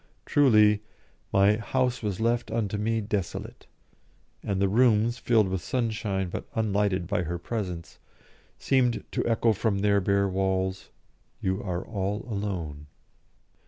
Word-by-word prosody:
Truly, 105 Hz, -7 st, +5 dB, 0.5 s
my 100 Hz, +2 st, +4 dB
"house 125 Hz, +1 st, -1 dB
was 100 Hz, -4 st, -3 dB
left 120 Hz, +1 st, 0 dB
unto 110 Hz, -3 st, -1 dB
me 115 Hz, +1 st, 0 dB
desolate," 100 Hz, -3 st, -4 dB, 0.7 s
and 100 Hz, -2 st, -2 dB
the 100 Hz, -, +3 dB
rooms, 115 Hz, +2 st, +3 dB
filled 110 Hz, -4 st, +3 dB
with 95 Hz, -1 st, -2 dB
sunshine 110 Hz, -6 st, -1 dB
but -, -, -6 dB
unlighted 100 Hz, -4 st, +1 dB
by 90 Hz, -, 0 dB
her 85 Hz, 0 st, -3 dB
presence, 90 Hz, -4 st, -5 dB, 0.6 s
seemed 125 Hz, -3 st, +1 dB
to -, -, -1 dB
echo 115 Hz, 0 st, +3 dB
from 105 Hz, 0 st, 0 dB
their 100 Hz, 0 st, +3 dB
bare 100 Hz, +1 st, +2 dB
walls, 95 Hz, 0 st, -1 dB, 0.5 s
"You 95 Hz, +1 st, -1 dB
are 90 Hz, -2 st, -3 dB
all 100 Hz, -1 st, -3 dB
alone." 90 Hz, -9 st, -4 dB
105 Hz, 130 wpm, -27 LUFS, 95-115 Hz, 0.7 s, Truly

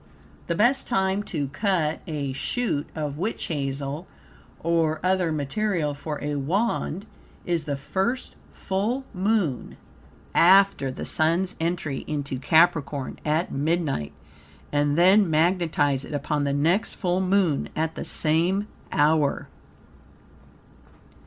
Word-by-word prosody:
The 170 Hz, -, 0 dB
best 240 Hz, +8 st, +2 dB
time 195 Hz, -3 st, +1 dB
TO 150 Hz, -9 st, -3 dB
CUT 165 Hz, -1 st, 0 dB
a 145 Hz, -4 st, -3 dB
shoot 150 Hz, -, -2 dB
of 150 Hz, -2 st, -4 dB
witch 215 Hz, +6 st, -2 dB
hazel 140 Hz, +1 st, -3 dB, 0.5 s
or 165 Hz, -1 st, +1 dB
other 185 Hz, -2 st, +2 dB
material 155 Hz, +1 st, -1 dB
for 150 Hz, +1 st, -5 dB
a 145 Hz, 0 st, -2 dB
Wand 190 Hz, +4 st, -1 dB, 0.4 s
is 170 Hz, -3 st, -1 dB
the 145 Hz, -2 st, -2 dB
first 195 Hz, -, -2 dB, 0.2 s
full 215 Hz, +8 st, -2 dB
Moon 190 Hz, -, -1 dB, 0.6 s
after 190 Hz, -5 st, +5 dB
the 130 Hz, -, -6 dB
Sun's 170 Hz, +4 st, +1 dB
entry 165 Hz, -4 st, -2 dB
into 145 Hz, -3 st, -3 dB
Capricorn, 150 Hz, -2 st, +2 dB
at 155 Hz, +3 st, 0 dB
midnight, 145 Hz, -, -1 dB, 0.6 s
and 145 Hz, 0 st, +1 dB
then 190 Hz, +2 st, +5 dB
magnetize 160 Hz, -4 st, +2 dB
it 150 Hz, -, -6 dB
upon 145 Hz, +1 st, -1 dB
the 140 Hz, -, 0 dB
next 165 Hz, +9 st, +1 dB
full 180 Hz, -1 st, 0 dB
Moon 185 Hz, -5 st, +1 dB
at 160 Hz, +1 st, -1 dB
the -, -, -5 dB
same 175 Hz, +6 st, +1 dB, 0.2 s
hour. 150 Hz, -1 st, +2 dB
160 Hz, 120 wpm, -25 LUFS, 145-190 Hz, 0.6 s, after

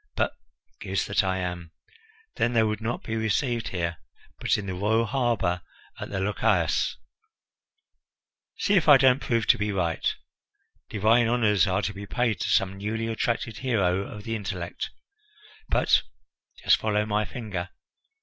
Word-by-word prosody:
But -, -, +1 dB, 0.5 s
goose 95 Hz, -1 st, -1 dB
that 100 Hz, +1 st, +1 dB
I 95 Hz, 0 st, 0 dB
am! 90 Hz, -2 st, -5 dB, 0.6 s
then 120 Hz, -, +1 dB
they 115 Hz, -1 st, +4 dB
would 110 Hz, 0 st, -1 dB
not 115 Hz, +2 st, -3 dB
be 115 Hz, -, -3 dB
received 115 Hz, +2 st, 0 dB
here, 85 Hz, -2 st, -2 dB, 0.4 s
but -, -, +1 dB
in 105 Hz, -, -5 dB
the 95 Hz, -, -3 dB
royal 110 Hz, +5 st, +1 dB
harbour 110 Hz, -7 st, 0 dB, 0.4 s
at -, -, -6 dB
the 95 Hz, -, -3 dB
Lochias. 100 Hz, +2 st, +1 dB, 1.6 s
See 205 Hz, -, +1 dB
if 180 Hz, -5 st, +4 dB
I 145 Hz, -, +10 dB
don't 130 Hz, 0 st, +4 dB
prove 115 Hz, -2 st, 0 dB
to -, -, +4 dB
be 105 Hz, 0 st, 0 dB
right! 85 Hz, -4 st, 0 dB, 0.8 s
Divine 115 Hz, +3 st, +3 dB
honours 105 Hz, -4 st, +3 dB
are 95 Hz, +2 st, 0 dB
to 100 Hz, +4 st, -2 dB
be 100 Hz, +1 st, -8 dB
paid 115 Hz, -4 st, 0 dB
to -, -, -2 dB
some 95 Hz, 0 st, +1 dB
newly 110 Hz, +3 st, -2 dB
attracted 115 Hz, 0 st, -2 dB
hero 100 Hz, -9 st, +1 dB
of 105 Hz, +1 st, -8 dB
the 115 Hz, +1 st, -3 dB
intellect. 95 Hz, -5 st, -4 dB, 0.8 s
But -, -, +4 dB, 0.6 s
just -, -, +5 dB
follow 105 Hz, -1 st, 0 dB
my 105 Hz, 0 st, 0 dB
finger! 105 Hz, -7 st, -5 dB
105 Hz, 155 wpm, -26 LUFS, 95-115 Hz, 1.6 s, I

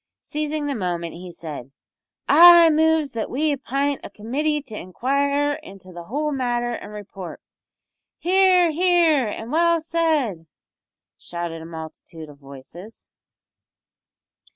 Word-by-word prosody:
Seizing 300 Hz, 0 st, -3 dB
the 285 Hz, -, -2 dB
moment, 175 Hz, -6 st, -3 dB
he 180 Hz, +1 st, -10 dB
said 150 Hz, -6 st, -8 dB, 0.6 s
"I 340 Hz, -1 st, +8 dB
moves 315 Hz, -2 st, +2 dB
that 230 Hz, -2 st, -4 dB
we 295 Hz, +3 st, 0 dB
apint 275 Hz, +2 st, -2 dB
a -, -, -8 dB
committee 295 Hz, +8 st, -2 dB
to 225 Hz, -6 st, -10 dB
inquire 280 Hz, +9 st, -1 dB
into 190 Hz, -1 st, -13 dB
the 175 Hz, -1 st, -10 dB
whole 295 Hz, -, -2 dB
matter 240 Hz, -3 st, -1 dB
an' 205 Hz, -, -7 dB
report." 200 Hz, -3 st, -9 dB, 0.8 s
"Hear, 365 Hz, -1 st, +3 dB
hear, 335 Hz, -6 st, +3 dB
and 220 Hz, +3 st, -6 dB
well 335 Hz, +1 st, +3 dB
said!" 310 Hz, -, -1 dB, 0.7 s
shouted 170 Hz, -1 st, -6 dB
a -, -, -9 dB
multitude 160 Hz, -1 st, -10 dB
of 145 Hz, -1 st, -15 dB
voices. 140 Hz, +10 st, -13 dB
255 Hz, 125 wpm, -22 LUFS, -, 0.8 s, I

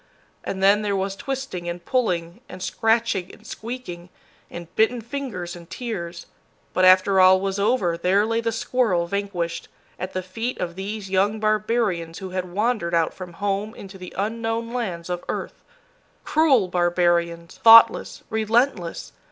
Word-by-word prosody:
And 190 Hz, 0 st, -4 dB
then 200 Hz, +2 st, +5 dB
there 205 Hz, -1 st, -1 dB
was 195 Hz, 0 st, -2 dB
twisting 255 Hz, -9 st, -4 dB
and 170 Hz, 0 st, -6 dB
pulling, 175 Hz, -9 st, -1 dB
and 185 Hz, 0 st, -8 dB
scratching 225 Hz, -5 st, 0 dB
and 215 Hz, -, -17 dB
squeaking, 220 Hz, -8 st, -7 dB, 0.4 s
and 170 Hz, -1 st, -10 dB
bitten 225 Hz, +3 st, +2 dB
fingers 230 Hz, -8 st, -5 dB
and 170 Hz, 0 st, -13 dB
tears; 175 Hz, -8 st, -5 dB, 0.5 s
but 185 Hz, -, +3 dB
after 185 Hz, +1 st, +6 dB
all 185 Hz, 0 st, +7 dB
was 195 Hz, +1 st, -2 dB
over, 200 Hz, -5 st, +1 dB
there 195 Hz, +4 st, +3 dB
lay 225 Hz, +1 st, 0 dB
the 230 Hz, 0 st, -1 dB
squirrel 225 Hz, -6 st, 0 dB
vanquished, 175 Hz, -3 st, -3 dB, 0.3 s
at 185 Hz, -, -5 dB
the 185 Hz, -, -3 dB
feet 225 Hz, +7 st, -4 dB
of 170 Hz, -1 st, -3 dB
these 195 Hz, +1 st, -6 dB
young 200 Hz, +3 st, +2 dB
barbarians 215 Hz, -6 st, 0 dB
who 190 Hz, -2 st, -7 dB
had 185 Hz, -1 st, -4 dB
wandered 210 Hz, -4 st, 0 dB
out 165 Hz, -1 st, +1 dB
from 180 Hz, -2 st, -9 dB
home 200 Hz, +3 st, -2 dB
into 195 Hz, -1 st, -11 dB
the 180 Hz, -1 st, -9 dB
unknown 225 Hz, +3 st, -2 dB
lands 185 Hz, -9 st, -3 dB
of 180 Hz, -1 st, -4 dB
earth. -, -, -5 dB, 0.6 s
Cruel 280 Hz, -, +3 dB
barbarians, 175 Hz, -1 st, 0 dB
thoughtless, 230 Hz, 0 st, +7 dB
relentless! 220 Hz, -4 st, 0 dB
195 Hz, 150 wpm, -23 LUFS, 175-225 Hz, 0.6 s, all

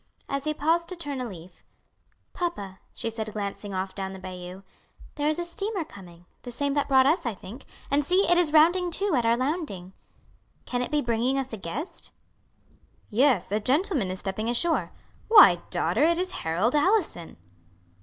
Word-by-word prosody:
As 275 Hz, +1 st, -3 dB
he 305 Hz, -, +1 dB
paused 330 Hz, +3 st, +1 dB
to 365 Hz, -, -4 dB
turn 290 Hz, -6 st, -5 dB
a 250 Hz, -, -3 dB
leaf, 175 Hz, -2 st, -12 dB, 0.7 s
"Papa," 205 Hz, -, -4 dB
she -, -, -5 dB
said, 220 Hz, -1 st, -4 dB
glancing 205 Hz, 0 st, -5 dB
off 190 Hz, 0 st, -3 dB
down 190 Hz, -1 st, -5 dB
the 190 Hz, -, -9 dB
bayou, 185 Hz, 0 st, -8 dB, 0.5 s
"there 295 Hz, 0 st, -2 dB
is 310 Hz, -, +2 dB
a 345 Hz, -, -2 dB
steamer 395 Hz, +2 st, -2 dB
coming, 175 Hz, -, -14 dB, 0.2 s
the 245 Hz, -, -8 dB
same 280 Hz, +3 st, -1 dB
that 285 Hz, 0 st, 0 dB
brought 265 Hz, -1 st, +5 dB
us, 310 Hz, +6 st, +2 dB
I 235 Hz, -4 st, -3 dB
think; 220 Hz, +8 st, -11 dB, 0.3 s
and 285 Hz, +1 st, +3 dB
see, 365 Hz, +6 st, +3 dB
it 350 Hz, -, +5 dB
is 350 Hz, -4 st, +2 dB
rounding 345 Hz, +4 st, +4 dB
to 395 Hz, +2 st, 0 dB
at 240 Hz, -4 st, +2 dB
our 230 Hz, +1 st, +3 dB
landing. 255 Hz, -, -3 dB, 0.7 s
Can 245 Hz, -1 st, -2 dB
it 250 Hz, -, -2 dB
be 300 Hz, -1 st, 0 dB
bringing 240 Hz, +3 st, 0 dB
us 265 Hz, -3 st, -3 dB
a -, -, -4 dB
guest?" 215 Hz, -, -6 dB, 1.0 s
"Yes, 255 Hz, 0 st, +2 dB
a 210 Hz, -, +1 dB
gentleman 275 Hz, -, +1 dB
is 185 Hz, 0 st, -4 dB
stepping 215 Hz, +4 st, -3 dB
ashore. 320 Hz, +8 st, +1 dB, 0.4 s
Why, 445 Hz, -3 st, +8 dB
daughter, -, -, 0 dB
it 335 Hz, +1 st, +3 dB
is 365 Hz, +1 st, -1 dB
Harold 175 Hz, +9 st, -1 dB
Allison." 300 Hz, -, 0 dB
260 Hz, 185 wpm, -26 LUFS, 200-325 Hz, 1.0 s, Why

